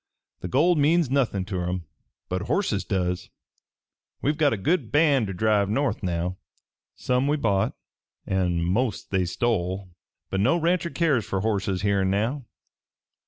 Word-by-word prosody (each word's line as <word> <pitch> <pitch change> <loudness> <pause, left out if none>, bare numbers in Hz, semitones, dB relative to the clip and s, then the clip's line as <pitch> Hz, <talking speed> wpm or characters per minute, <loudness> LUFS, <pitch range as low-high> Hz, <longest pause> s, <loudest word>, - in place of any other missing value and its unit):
The - - -5
gold 155 - +3
means 155 -1 +3
nothin' 120 -9 +1
ter 90 -3 -3
'em, 90 -1 -3 0.4
but 90 +1 -2
horses 110 - 0
does. 90 -2 -2 0.9
We've 150 +2 0
got 150 -2 +3
a 115 - 0
good 165 - 0
band 145 -6 +3
ter 95 - -4
drive 105 +1 +2
north 125 0 0
now. 90 -1 -2 0.6
Some 125 +2 0
we 150 +1 +2
bought 100 -8 +1 0.5
an' 90 -3 0
most 110 +7 -1
they 95 -2 +1
stole, 95 -2 -1 0.4
but 95 - 0
no 125 - +3
rancher 170 +1 +1
cares 145 -7 +1
fer 95 - -1
horses 100 -3 -1
here 100 -1 +2
an' 95 - +1
now. 115 +8 -1
105 Hz, 155 wpm, -25 LUFS, 95-140 Hz, 0.9 s, gold